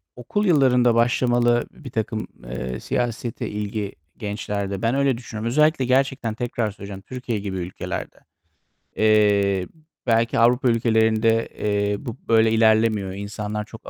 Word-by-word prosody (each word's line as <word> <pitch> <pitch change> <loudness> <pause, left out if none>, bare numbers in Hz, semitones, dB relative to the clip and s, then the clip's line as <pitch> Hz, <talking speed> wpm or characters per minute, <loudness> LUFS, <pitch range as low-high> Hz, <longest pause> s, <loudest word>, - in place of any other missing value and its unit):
okul 205 - -2
yıllarında 125 -8 +4
başlamalı 120 0 +2
birtakım, 110 -6 -4 0.2
eee, 65 +1 -5
siyasete 120 -1 -3
ilgi 105 -1 -4 0.2
gençlerde. 100 -2 -3
Ben 115 +3 +1
öyle 140 -3 +2
düşünüyorum. 115 -2 -6
Özellikle 150 +1 +3
gerçekten 130 -3 +1
tekrar 115 -2 -2
söyleyeceğim, 100 -1 -9
Türkiye 125 0 -4
gibi 100 -2 -4
ülkelerde. 90 0 -5 0.8
Eee, 100 -3 +3
b 160 - -25 0.3
belki 115 0 +2
Avrupa 120 +2 +4
ülkelerinde, 115 -1 +2
eee, 105 0 0
bu 120 +1 -5
böyle 110 -1 +4
ilerlemiyor. 110 -3 +3
İnsanlar 105 +1 -4
çok 110 0 -12
110 Hz, 125 wpm, -23 LUFS, 105-120 Hz, 0.8 s, yıllarında